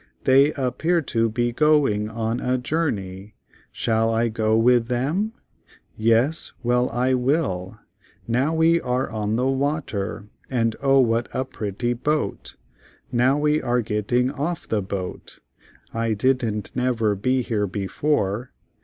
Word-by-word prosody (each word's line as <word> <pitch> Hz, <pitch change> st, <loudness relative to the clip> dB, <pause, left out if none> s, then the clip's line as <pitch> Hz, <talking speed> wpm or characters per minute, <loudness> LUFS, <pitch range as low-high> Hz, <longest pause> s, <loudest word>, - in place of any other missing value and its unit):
They 135 Hz, +3 st, +5 dB
appear 150 Hz, +6 st, 0 dB
to 115 Hz, -3 st, 0 dB
be 120 Hz, +2 st, 0 dB
go 150 Hz, +2 st, +4 dB
ing 105 Hz, 0 st, -1 dB
on 115 Hz, +1 st, -2 dB
a 125 Hz, 0 st, 0 dB
jour 155 Hz, +5 st, 0 dB
ney, 95 Hz, -1 st, -6 dB, 0.4 s
shall 115 Hz, 0 st, +1 dB
I 115 Hz, +1 st, +1 dB
go 110 Hz, 0 st, +1 dB
with 120 Hz, 0 st, +4 dB
them? 150 Hz, -, -1 dB, 0.6 s
Yes, 115 Hz, +8 st, +1 dB
well 125 Hz, +1 st, +2 dB
I 125 Hz, +2 st, +1 dB
will. 125 Hz, -, 0 dB, 0.5 s
Now 125 Hz, +6 st, +1 dB
we 165 Hz, +1 st, +3 dB
are 125 Hz, 0 st, -1 dB
on 105 Hz, -1 st, -1 dB
the 125 Hz, +2 st, 0 dB
wa 140 Hz, +4 st, +1 dB
ter 100 Hz, -4 st, -5 dB, 0.2 s
and—O 130 Hz, +3 st, +2 dB
what 115 Hz, -1 st, +1 dB
a 130 Hz, -, 0 dB
pret 105 Hz, -6 st, -6 dB
ty 120 Hz, 0 st, 0 dB
boat—now 130 Hz, -1 st, -2 dB
we 150 Hz, +1 st, +2 dB
are 120 Hz, 0 st, +1 dB
get 105 Hz, -1 st, -3 dB
ting 125 Hz, +1 st, +2 dB
off 160 Hz, +5 st, -3 dB
of -, -, -22 dB
the 110 Hz, -2 st, +1 dB
boat—I 100 Hz, +4 st, -6 dB
didn't 115 Hz, -2 st, 0 dB
nev 125 Hz, -1 st, 0 dB
er 105 Hz, -1 st, +3 dB
be 130 Hz, +6 st, 0 dB
here 105 Hz, -3 st, -1 dB
be 100 Hz, +1 st, -4 dB
fore. 120 Hz, -2 st, -1 dB
120 Hz, 150 wpm, -23 LUFS, 110-135 Hz, 0.6 s, They